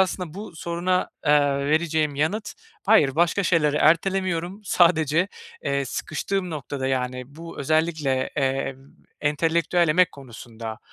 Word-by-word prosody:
aslında 180 -3 -1
bu 200 -4 -8
soruna, 175 +2 -1 0.2
eee, 150 0 +6 0.3
vereceğim 155 -1 +1
yanıt: 190 +9 -1 0.3
"Hayır, 150 -12 +5
başka 175 +4 +2
şeyleri 155 -5 +2
ertelemiyorum. 180 +3 +1
Sadece, 170 -1 +3 0.4
eee, 140 0 0
sıkıştığım 180 +7 -3
noktada, 140 -3 -4
yani, 125 -1 -2
bu 165 +1 -9
özellikle, 155 0 +1 0.2
emm, 135 0 -2 0.2
entelektüel 165 +3 +1
emek 180 +3 +3
konusunda, 115 -4 -9
160 Hz, 115 wpm, -24 LUFS, 140-175 Hz, 0.4 s, eee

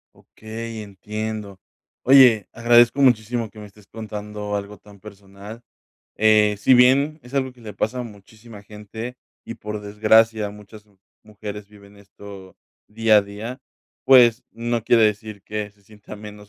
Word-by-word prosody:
Okey, 110 0 -9
entiendo. 105 0 -7 0.4
Oye, 125 -6 +6
agradezco 120 +3 +4
muchísimo 115 -2 +1
que 105 - -15
me 105 - -10
estés 105 0 -18
contando 105 -1 -7
algo 100 0 -6
tan 100 -1 -18
personal, 100 +2 -13 0.6
eh, 105 -1 +3
si 130 +5 +4
bien 140 +5 +3
es 125 +2 -16
algo 130 -2 -1
que 125 - -22
le 110 -2 -9
pasa 110 +5 -3
a - - -3
muchísima 110 0 -14
gente 110 +4 -9 0.3
y, - - -8
por 105 0 -7
desgracia, 110 +1 +2
muchas 105 +1 -14
mu 100 -2 -31 0.3
mujeres 105 -1 -9
viven 100 -1 -18
esto 100 -1 -14 0.3
día 110 0 +3
a - - +1
día, 110 +6 -8 0.4
pues, 125 -2 +5
no 115 0 -3
quiere 115 0 +3
decir 105 -1 -3
que 105 0 -5
se 100 0 -31
sienta 105 +1 -13
menos 105 -1 -12
105 Hz, 155 wpm, -21 LUFS, 105-115 Hz, 0.6 s, Oye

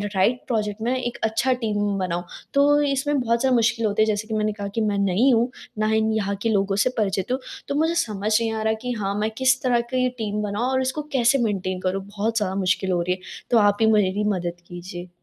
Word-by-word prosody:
Right 230 +7 +2
project 215 -3 -2
में 245 +3 0
एक 240 -1 -3
अच्छा 230 +4 +2
टीम 205 -2 0
बानाऊँ, 175 -1 -2 0.3
तो 290 +1 +4
इसमें 285 0 +1
बहुत 235 0 +1
ज़्यादा 260 -2 +3
मुश्किल 230 0 +2
होती 215 +1 +2
जैसे 215 0 -1
कि 220 - -4
मैंने 215 0 +1
कहा 200 -1 -5
कि 225 - +1
मैं 205 -2 0
नई 200 +7 +3
हूँ, 240 +2 +2 0.3
ना 215 - +2
ही 220 0 +2 0.2
यहाँ 200 -1 -1
के 230 - +1
लोगों 200 -2 +1
से - - +3
परिचित 195 +1 -1
हूँ। 260 - 0 0.3
तो 280 - -2
मुझे 325 +3 +1
समझ 215 0 -1
नहीं 225 -1 -1
आ 220 - -3
रहा 220 0 +1
कि 250 0 -3
हाँ, 200 -2 -2
मैं 215 +1 0
किस 260 0 +3
तरह 240 -2 +3
की 255 0 +2
टीम 210 -1 -2
बनाऊँ 210 +5 -1
और 260 0 +1
इसको 260 +4 -2
कैसे 260 +1 +4
मेंटेन 185 -3 -1
करूँ? 190 +1 -1
बहुत 215 +3 -2
ज़्यादा 190 -3 0
मुश्किल 190 0 0
हो 175 -1 +1
रही 180 +1 0
है। - - -16 0.3
तो 235 - +5
आप 205 -1 +4
ही 220 - +5
मेरी 205 -1 +2
मदद 175 -1 -4
कीजिए। 175 0 -8
215 Hz, 235 wpm, -23 LUFS, 200-245 Hz, 0.3 s, तो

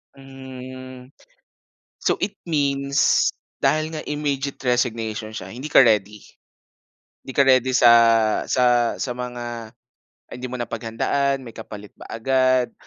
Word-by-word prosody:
Hmm. 130 -1 -11 0.9
So - - +1
it 200 0 -8
means, 140 -3 +2 0.3
dahil 155 +1 +1
nga 155 - -4
immediate 145 -2 -2
resignation 115 -3 -1
siya, - - -7
hindi 130 +6 -7
ka 135 - +7
ready? 105 -2 +1 1.0
'Di 130 - -9
ka 140 - +5
ready 130 -1 +4
sa 120 -2 +6 0.6
sa 120 -2 +2
sa 130 - -3
mga 120 -2 -6 0.6
hindi 125 - -8
mo 125 - -5
napaghandaan, 135 +4 -1
may 115 - -10
kapalit 105 -2 -10
ba - - -11
agad? 130 +1 +1
130 Hz, 120 wpm, -22 LUFS, 120-135 Hz, 1.0 s, ka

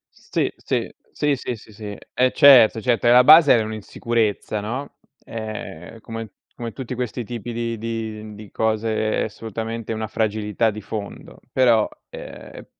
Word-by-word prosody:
Sì, - - -2
sì, - - -2 0.2
sì, 150 -1 +1
sì, 125 -1 -4
sì, 110 0 -16
sì, 105 -1 -7 0.2
eh 130 0 +3
certo, 120 -5 +7
certo 120 0 +1
e - - +6
la 125 +1 +8
base 155 0 +8
è - - +2
un'insicurezza, 110 0 -2
no? 125 +7 -5 0.3
Ehm, 110 -3 -7
come 115 -1 -7 0.3
come 120 -1 -5
tutti 130 -2 -6
questi 125 0 -3
tipi 120 +1 -6
di 115 0 -3
di 110 -1 -5
di 105 0 -11
cose 110 0 0
è - - +1
assolutamente 115 +1 -5
una 110 0 -3
fragilità 110 +1 0
di 105 +1 -8
fondo, 100 0 -7
però 120 -4 +4 0.2
ehm, - - -10
115 Hz, 155 wpm, -22 LUFS, 110-120 Hz, 0.3 s, la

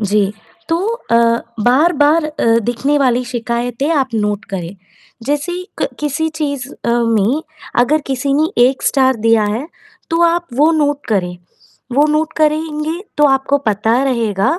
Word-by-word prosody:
जी, 205 -1 +1 0.4
तो 330 - +2 0.3
अ, 230 - +5 0.5
बार-बार 300 +4 +3
अ, 305 -5 -3 0.2
दिखने 275 +5 0
वाली 250 -2 +2
शिकायतें 240 +2 -2
आप 275 -4 +1
नोट 210 -1 -1
करें। 180 0 -5 0.5
जैसे 295 +5 -1 0.3
क - - 0
किसी 300 +2 -1
चीज़ 285 -4 -3
अ, - - -6
में 235 +3 +1 0.4
अगर 300 +6 +2
किसी 270 +1 -1
ने 310 +2 +2 0.2
1 265 +1 -1
स्टार 265 -2 +2
दिया 225 -1 +4
है, 220 +7 -2 0.4
तो 330 +1 +1
आप 340 0 +2
वो 295 +5 +4
नोट 290 -2 0
करें। 180 -4 -1 0.6
वो 290 +4 +4
नोट 315 +1 0
करेंगे 310 +1 0 0.2
तो 295 - +5
आपको 270 +1 +2
पता 220 +4 +1
रहेगा 230 - 0
270 Hz, 150 wpm, -16 LUFS, 230-300 Hz, 0.6 s, अ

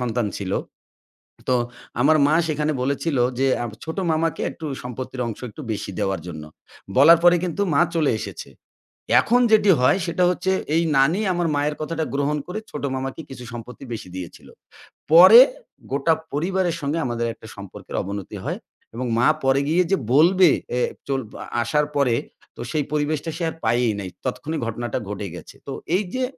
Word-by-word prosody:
সন্তান 120 -2 -1
ছিল। 95 -1 -4 1.0
তো 130 - +3 0.5
আমার 155 +4 +5
মা 150 - +2
সেখানে 150 0 0
বলেছিল 140 +2 -1 0.2
যে, 135 - +3 0.2
আব 115 - -5
ছোট 160 +3 -6
মামাকে 160 +1 0
একটু 160 - -9 0.2
সম্পত্তির 125 +1 -6
অংশ 115 - -6
একটু 150 - -10
বেশি 100 -1 -4
দেওয়ার 95 -4 -1
জন্য। 80 -3 -7 0.5
বলার 160 +5 +8
পরে 175 0 +7
কিন্তু 180 +2 -2
মা 140 - +4
চলে 155 -3 +2
এসেছে। - - -7 0.7
এখন 245 - +2
যেটি 210 -2 +5
হয় 130 +9 +4
সেটা 180 +2 +1
হচ্ছে, 190 +1 0 0.2
এই 165 - +3 0.2
নানি 160 +10 +3
আমার 175 -1 0
মায়ের 145 +1 0
কথাটা 160 +1 -2
গ্রহণ 145 +1 0
করে, 180 +4 -5
ছোট 150 - -6
মামাকে 135 +3 -4
কিছু 125 -2 -9
সম্পত্তি 120 +2 -9
বেশি 110 -5 -6
দিয়েছিল। 90 -2 -9 0.6
পরে 185 +8 +10 0.5
গোটা 145 +4 +2 0.2
পরিবারের 175 +3 0
সঙ্গে 145 +3 -1
আমাদের 120 -1 -2
একটা 110 - -14
সম্পর্কের 100 -2 -9
অবনতি 100 0 -6
হয়। - - -3 0.4
এবং 125 +1 -3
মা 125 - +4 0.2
পরে 135 +1 +3
গিয়ে 170 +4 +3
যে 195 - +4 0.2
বলবে, 180 +4 +6 0.3
এ - - +1 0.3
চল 135 -1 0 0.4
আসার 150 +5 +1
পরে 130 -5 +3 0.4
তো, - - -7
সেই 155 -2 0
পরিবেশটা 150 +1 -1
সে 175 - -4
আর - - -8
পায়েই 120 -2 +2
নাই। 95 -2 -5 0.2
তৎক্ষণিক 150 +5 -3
ঘটনাটা 115 0 -3
ঘটে 105 -1 -4
গেছে। - - -11
তো - - -4 0.2
এই 200 - +1
যে 260 0 -1
145 Hz, 170 wpm, -22 LUFS, 120-165 Hz, 1.0 s, পরে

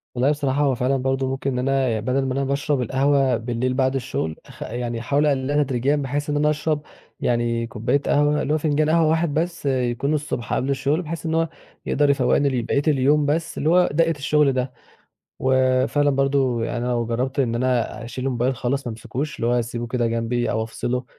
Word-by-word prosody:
والله 130 +4 +3
بصراحة 145 -1 0
هو 140 -3 +2
فعلًا 130 +3 +1
برضه 130 +1 -1
ممكن 135 +1 -2
إن 125 - -2
أنا 135 0 +1
ي - - -4
بَدَل 130 +4 0
ما 130 - -1
أنا 140 +1 0
باشرب 140 0 0
القهوة 135 +2 +2
بالليل 120 +2 -2
بعد 130 0 +1
الشُغل، 120 -11 -2
أخ - - -9
يعني 120 0 -4
أحاول 140 +5 +1
أقلِّلها 145 +1 +1
تدريجيًا 135 +1 0
بحيث 145 +1 -2
إن 145 - 0
أنا 150 +1 +3
أشرب 150 0 0 0.4
يعني 120 -1 0
كوبّاية 120 +5 0
قهوة، 150 +1 +2
اللي 150 - 0
هو 155 - +3
فنجان 155 0 +1
قهوة 165 0 +4
واحد 160 -2 +1
بس 165 0 -2
يكون 130 +1 0
الصبح 150 -5 -3
قبل 135 - 0
الشُغل، 140 +4 0
بحيث 165 -2 -6
إن 160 - -1
هو 165 -1 +1 0.4
يقدر 145 0 +2
يفوَّقني 140 0 +3
لبقية 130 +2 0
اليوم 145 +1 +3
بس 160 +3 -1
اللي 155 - +1
هو 180 +1 +4
دَقّة 165 +1 +3
الشُغل 150 -1 +2
ده. 130 0 -2 0.7
وفعلًا 130 +2 +2
برضه 135 -3 +1
يعنى 120 - -3
أنا 125 - -1
لو 120 -1 0
جرّبت 125 +4 -2
إن 120 -3 0
أنا 120 -1 -1
أشيل 130 +3 -4
الmobile 125 +3 +2
خالص 130 +2 -2
ما - - -2
أمسكوش، 135 +6 -5
اللي 115 - -2
هو 120 - +2
أسيبه 120 0 -3
كده 120 0 0
جنبي 115 +1 -1
أو 110 +1 0
أفصله 125 +3 -3
135 Hz, 205 wpm, -22 LUFS, 125-145 Hz, 0.7 s, قهوة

